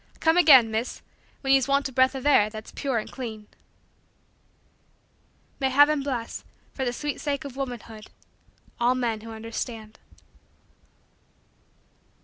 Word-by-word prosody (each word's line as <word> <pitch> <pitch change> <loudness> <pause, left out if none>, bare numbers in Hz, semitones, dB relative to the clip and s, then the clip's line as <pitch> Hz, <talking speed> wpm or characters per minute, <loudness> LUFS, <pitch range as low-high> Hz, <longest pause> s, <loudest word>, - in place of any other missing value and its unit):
"Come 320 0 +3
again, 270 -10 +7
Miss, 225 +3 -3 0.4
when 270 -1 +2
ye's 270 -1 +3
want 280 0 +2
a - - -10
breath 260 +1 +3
of 265 - -6
air 215 -8 +5
that's 215 0 -9
pure 270 -4 -2
and 215 - -4
clean." 220 -5 -7 2.1
May 265 -1 +1
heaven 290 +2 +4
bless, 250 -5 -4 0.3
for 265 - -3
the 245 - 0
sweet 295 +4 -4
sake 290 0 -2
of 275 -2 -8
womanhood, 240 -5 -7 0.7
all 245 +2 +3
men 230 -4 -2
who 225 - -10
understand. 225 0 -7
255 Hz, 130 wpm, -25 LUFS, 225-275 Hz, 2.1 s, again